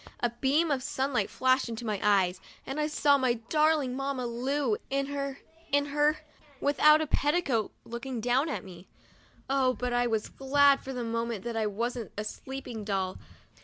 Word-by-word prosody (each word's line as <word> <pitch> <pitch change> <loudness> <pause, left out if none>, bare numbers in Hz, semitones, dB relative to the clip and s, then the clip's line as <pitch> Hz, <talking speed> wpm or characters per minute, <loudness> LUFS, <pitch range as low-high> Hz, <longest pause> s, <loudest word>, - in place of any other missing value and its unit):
A 240 - 0
beam 280 +7 +1
of 270 -2 +1
sunlight 270 -1 -1
flashed 260 -1 +2
into 230 +1 -5
my 210 -3 -1
eyes, 190 -3 +2 0.2
and 270 +3 -4
I 300 - +1
saw 290 -2 +3
my 255 -2 +2
darling 295 +2 +1
Mamma 270 -2 -2
Lu 245 0 0
in 275 0 0
her 275 -1 -4 0.2
— 330 -1 -28
in 285 0 +3
her 295 +2 +1 0.2
— 285 -3 -27
without 300 +2 +5
a - - 0
petticoat, 290 -7 +1
looking 235 +1 -5
down 250 +7 +1
at - - -3
me. 180 -1 -12 0.6
Oh, 265 -1 +2
but 250 -1 -2
I 245 0 +2
was 220 -2 -1
glad 280 +1 +3
for 265 - -7
the 250 -2 -3
moment 230 -2 -2
that 235 -1 -4
I 220 -1 +1
wasn't 230 +3 -3
a 210 - -2
sleeping 245 0 -6
doll 190 -2 -2
260 Hz, 185 wpm, -29 LUFS, 230-285 Hz, 0.6 s, without